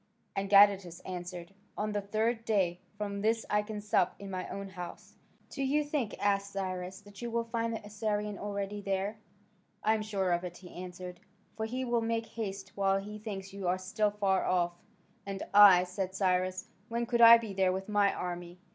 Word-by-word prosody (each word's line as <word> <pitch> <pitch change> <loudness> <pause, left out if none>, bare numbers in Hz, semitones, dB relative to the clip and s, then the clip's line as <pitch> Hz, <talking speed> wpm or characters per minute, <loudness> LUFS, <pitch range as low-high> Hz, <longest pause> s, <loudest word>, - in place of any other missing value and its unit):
And 195 0 -2
Gadatas 195 -4 +5
answered, 180 0 -6 0.2
"On 210 0 -1
the 205 0 -1
third 220 +3 0
day 190 -6 +1 0.2
from 200 -1 -3
this 225 +2 +1
I 210 0 +3
can 210 0 -6
sup 185 -3 +2
in 200 -1 -8
my 185 -1 -4
own 200 0 -5
house." 180 -2 -9 0.4
"Do 275 - -5
you 290 +3 +2
think," 290 -7 -2
asked 200 0 0
Cyrus, 185 -1 -4
"that 205 +1 -14
you 240 - -3
will 235 0 0
find 230 0 -2
the 225 -2 -5
Assyrian 210 -1 -2
already 205 0 -3
there?" 195 +2 -2 0.6
"I 220 - +4
am 220 - 0
sure 200 -4 -1
of 175 0 +1
it," 180 -1 -6
he 180 - -13
answered, 180 0 -8 0.4
"for 220 0 -2
he 255 +3 -3
will 240 -1 +1
make 225 0 -1
haste 200 -4 -5
while 195 -1 +2
he 210 +2 -6
thinks 195 -2 -6
you 195 -2 -4
are 180 +1 +2
still 205 +3 0
far 200 -2 +1
off." 175 -1 +1 0.5
"And 195 -1 -4
I," 200 -3 +9
said 185 +1 -4
Cyrus, 185 -1 0 0.2
"when 235 +1 -1
could 235 0 +1
I 230 0 +11
be 225 -3 -6
there 190 -1 +2
with 190 +1 -3
my 205 -2 +3
army?" 175 0 -5
200 Hz, 195 wpm, -31 LUFS, 185-215 Hz, 0.6 s, I